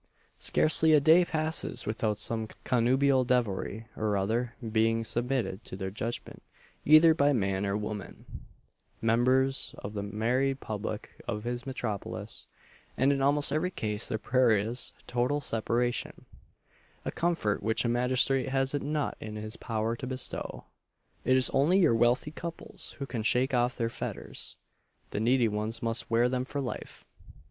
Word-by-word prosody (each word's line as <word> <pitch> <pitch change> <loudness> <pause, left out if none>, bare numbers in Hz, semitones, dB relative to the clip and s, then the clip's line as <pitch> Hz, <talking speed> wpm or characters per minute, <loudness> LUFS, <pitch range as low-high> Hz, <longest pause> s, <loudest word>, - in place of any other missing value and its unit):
Scarcely 160 0 +4
a 150 - +7
day 160 +5 +6
passes 160 -1 -1
without 105 -1 -1
some 110 +1 -1 0.2
connubial 130 +2 +3
devilry, 115 -3 -1
or 105 -2 0
other, 115 +5 -1 0.2
being 115 +1 +2
submitted 120 -3 -1
to - - -6
their 95 0 -4
judgment 115 +4 -5 0.4
either 155 +2 +7
by 145 -2 +3
man 95 -4 0
or 100 +1 0
woman 105 -2 -6 0.7
members 130 +4 +2
of 105 - -7
the 100 - -3
married 125 +7 0
public 105 -5 -6
of 105 0 -3
this 120 +1 -4
metropolis; 115 -6 -4 0.5
and 135 +2 +4
in 135 - -1
almost 145 +1 +3
every 155 +5 +1
case 105 - -3
their 110 - -1
prayer 120 -1 +3
is, 115 +5 -2
total 125 +4 0
separation 120 -1 -2 0.8
a - - -1
comfort 165 -12 0
which 110 +3 0
a - - +2
magistrate 125 +2 +2
has 135 +1 0
it 145 - -1
not 150 0 -1
in 110 -1 -7
his 110 +1 -5
power 115 0 -2
to 130 +2 -6
bestow. 130 0 -4 0.6
It 130 +1 +4
is 130 - +5
only 150 +8 +3
your 175 -11 +5
wealthy 120 +5 +2
couples 165 +1 -6
who 140 - -4
can 120 -4 -4
shake 125 +5 +2
off 120 0 +1
their 115 -2 0
fetters 115 - -6 0.6
the - - -2
needy 120 +2 +3
ones 110 +2 -3
must 115 0 -1
wear 115 +1 +3
them 125 0 -1
for 140 +2 -5
life. 130 -3 -6
120 Hz, 155 wpm, -29 LUFS, 110-135 Hz, 0.8 s, a